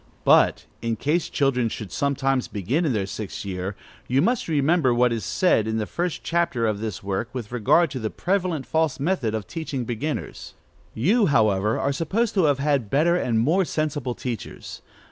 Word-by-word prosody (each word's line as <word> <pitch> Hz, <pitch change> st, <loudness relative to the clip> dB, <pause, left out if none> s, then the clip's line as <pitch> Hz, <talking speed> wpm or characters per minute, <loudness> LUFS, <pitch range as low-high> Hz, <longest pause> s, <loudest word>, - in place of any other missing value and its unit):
2. -, -, -35 dB
But, -, -, +4 dB, 0.2 s
in 115 Hz, -1 st, -1 dB
case 150 Hz, +9 st, 0 dB
children 125 Hz, -4 st, +1 dB
should 105 Hz, -2 st, -7 dB
sometimes 135 Hz, -2 st, 0 dB
begin 120 Hz, -, -1 dB
in 140 Hz, -, +1 dB
their 100 Hz, -3 st, 0 dB
sixth 100 Hz, +1 st, -6 dB
year, 95 Hz, 0 st, -4 dB, 0.3 s
you 130 Hz, +2 st, +2 dB
must 230 Hz, -, +1 dB
remember 150 Hz, -3 st, +2 dB
what 120 Hz, 0 st, +3 dB
is 115 Hz, -3 st, -3 dB
said, 110 Hz, -, +2 dB
in 110 Hz, 0 st, -1 dB
the 110 Hz, -, -1 dB
first 175 Hz, +8 st, -3 dB
chapter 170 Hz, -9 st, 0 dB
of 105 Hz, -2 st, 0 dB
this 110 Hz, -4 st, -5 dB
work, 100 Hz, +4 st, -2 dB
with 120 Hz, -4 st, -6 dB
regard 125 Hz, +9 st, +3 dB
to 130 Hz, -, -4 dB
the 110 Hz, -2 st, -2 dB
prevalent 180 Hz, -, -1 dB
false 160 Hz, -3 st, 0 dB
method 140 Hz, -, 0 dB
of 110 Hz, -2 st, -4 dB
teaching 150 Hz, -7 st, -4 dB
beginners. 135 Hz, +6 st, -4 dB, 0.4 s
You, 200 Hz, -, +3 dB
however, 110 Hz, -, +2 dB
are 140 Hz, -, 0 dB
supposed 195 Hz, +10 st, 0 dB
to 190 Hz, -5 st, +3 dB
have 145 Hz, -2 st, +3 dB
had 140 Hz, -6 st, 0 dB
better 160 Hz, +7 st, +3 dB
and 120 Hz, -10 st, 0 dB
more 160 Hz, +12 st, +3 dB
sensible 145 Hz, -7 st, -2 dB
teachers. 120 Hz, -4 st, -6 dB
135 Hz, 185 wpm, -24 LUFS, 110-160 Hz, 0.4 s, But